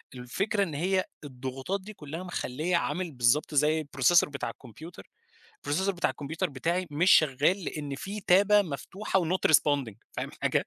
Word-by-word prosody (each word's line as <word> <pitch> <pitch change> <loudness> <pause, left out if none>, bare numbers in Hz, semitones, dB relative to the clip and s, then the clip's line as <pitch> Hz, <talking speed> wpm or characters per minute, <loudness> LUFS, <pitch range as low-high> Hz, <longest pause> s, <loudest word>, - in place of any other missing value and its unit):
الفكرة 195 - -1
إن 170 -6 -4
هي 185 +5 +1 0.2
الضغوطات 135 +7 -5
دي 210 +3 -10
كلها 160 0 -7
مخليّة 175 -1 -2
عامل 175 0 -2
بالضبط 130 +4 +1
زي 155 +2 +3
الprocessor 145 +4 +3
بتاع 140 -4 -4
الكمبيوتر 155 - -12 0.6
processor 190 +7 +1
بتاع 175 -3 0
الكمبيوتر 150 +2 -4
بتاعي 170 +7 -1
مش 165 +6 +2
شغّال 155 +6 +4
لأن 145 -3 -4
في 200 +9 -6
تابة 205 +2 +5
مفتوحة 190 +5 -2
وnot 180 +2 +1
responding 145 -7 +3 0.2
فاهم - - -4
حاجة؟ - - +1
160 Hz, 150 wpm, -28 LUFS, 140-185 Hz, 0.6 s, تابة